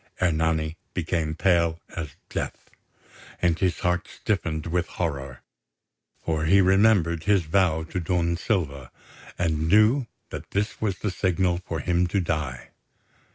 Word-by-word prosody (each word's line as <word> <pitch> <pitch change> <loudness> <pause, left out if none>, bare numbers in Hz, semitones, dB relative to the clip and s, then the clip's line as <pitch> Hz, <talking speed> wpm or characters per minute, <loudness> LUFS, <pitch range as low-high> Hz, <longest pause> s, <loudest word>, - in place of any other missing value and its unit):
Ernani 80 -2 +1 0.2
became 80 -3 -1
pale 85 -2 +2 0.2
as 80 -4 -5
death, - - -5 0.7
and 85 -1 +2
his 90 -3 0
heart 90 0 0
stiffened 80 -7 -2
with 85 +1 0
horror; 70 -6 -4 0.8
for 80 -1 0
he 95 +5 +5
remembered 95 -4 +4
his 100 -3 +4
vow 80 -1 +2
to 85 +3 -4
Don 85 0 0
Silva, 75 - -2 0.5
and 80 -2 0
knew 110 +6 +5 0.2
that - - -7
this 105 +2 -2
was 100 -4 0
the 105 - -2
signal 90 -1 +1
for 80 -3 -2
him 90 +3 +1
to 100 +3 0
die. 75 -8 -3
85 Hz, 135 wpm, -25 LUFS, 80-95 Hz, 0.8 s, he